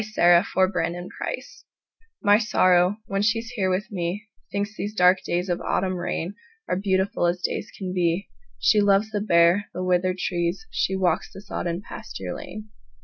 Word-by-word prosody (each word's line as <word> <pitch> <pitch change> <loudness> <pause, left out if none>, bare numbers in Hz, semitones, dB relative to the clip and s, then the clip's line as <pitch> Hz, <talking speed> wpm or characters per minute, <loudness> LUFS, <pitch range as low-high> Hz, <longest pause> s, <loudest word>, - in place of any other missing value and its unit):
My - - -9 0.5
November 180 -1 0
Guest - - -6 0.6
MY 205 0 +6
Sorrow, 185 -3 +3
when 195 0 -1
she's 225 +2 +1
here 200 -6 0
with 185 +4 -1
me, 180 +2 -3 0.3
Thinks 205 +1 -2
these 210 +1 -4
dark 180 -1 +5
days 175 +2 -1
of 175 -1 -1
autumn 185 0 0
rainAre 190 - -4
beautiful 190 -2 +1
as 175 +1 0
days 210 - -2
can 185 -2 -4
be; 175 +1 0 0.3
She 210 - +4
loves 205 +2 +3
the 205 -1 -1
bare, 175 0 +4
the 180 - -2
withered 185 0 +1
tree; 175 0 -1
She 190 - 0
walks 180 -4 0
the - - -10
sodden 175 -2 -4
pasture 90 - -7
lane. 215 +4 -8
190 Hz, 160 wpm, -24 LUFS, 180-205 Hz, 0.6 s, MY